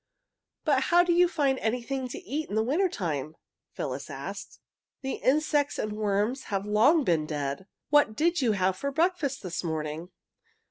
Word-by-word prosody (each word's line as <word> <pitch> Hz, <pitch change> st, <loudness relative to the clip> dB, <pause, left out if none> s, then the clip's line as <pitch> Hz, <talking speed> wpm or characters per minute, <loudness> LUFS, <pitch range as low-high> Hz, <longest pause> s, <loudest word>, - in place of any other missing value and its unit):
"But 270 Hz, -4 st, +3 dB
how 350 Hz, +1 st, +5 dB
do 350 Hz, -1 st, +2 dB
you 355 Hz, +1 st, +5 dB
find 280 Hz, -6 st, +1 dB
anything 250 Hz, +3 st, -2 dB
to 245 Hz, -, -7 dB
eat 300 Hz, +4 st, -3 dB
in 205 Hz, -, -3 dB
the 220 Hz, -, +3 dB
winter 330 Hz, -, +2 dB
time?" 155 Hz, -, -3 dB, 0.4 s
Phyllis -, -, -4 dB
asked. -, -, -7 dB, 0.4 s
"The 265 Hz, -, -2 dB
insects 290 Hz, +1 st, +1 dB
and 215 Hz, 0 st, -2 dB
worms 210 Hz, +5 st, 0 dB
have 195 Hz, -1 st, -2 dB
long 235 Hz, +10 st, +4 dB
been 160 Hz, -8 st, +1 dB
dead. 145 Hz, +4 st, -3 dB, 0.2 s
What 290 Hz, -7 st, +4 dB
did 340 Hz, +3 st, +2 dB
you 235 Hz, -4 st, +3 dB
have 190 Hz, -1 st, +1 dB
for 280 Hz, +9 st, -3 dB
breakfast 315 Hz, -4 st, 0 dB
this 180 Hz, -1 st, -4 dB
morning?" 160 Hz, +1 st, -3 dB
250 Hz, 170 wpm, -28 LUFS, 190-295 Hz, 0.4 s, how